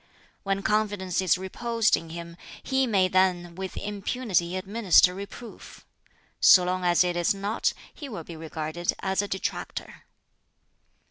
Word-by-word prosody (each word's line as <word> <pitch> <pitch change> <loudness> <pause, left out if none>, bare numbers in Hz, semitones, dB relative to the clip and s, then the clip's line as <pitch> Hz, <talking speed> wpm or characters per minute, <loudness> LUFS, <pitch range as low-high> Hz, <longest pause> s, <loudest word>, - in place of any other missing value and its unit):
"When 195 0 -2
confidence 205 -4 0
is 185 -1 +3
reposed 225 +4 +1
in 165 - -7
him, 170 0 -8 0.3
he 265 -1 +1
may 195 -5 +3
then 180 -2 +1
with 190 +1 -6
impunity 200 -3 -1
administer 190 -2 +4
reproof; 200 +4 -10 0.5
so 180 - +7
long 180 +1 -1
as 175 0 +4
it 175 -1 -1
is 175 +3 +1
not, 200 +3 -1 0.2
he 290 -3 -9
will 205 -8 -6
be 170 - -10
regarded 160 +1 -3
as 190 +1 +1
a 205 - -4
detractor. 190 -1 -5
190 Hz, 140 wpm, -26 LUFS, 175-205 Hz, 0.5 s, so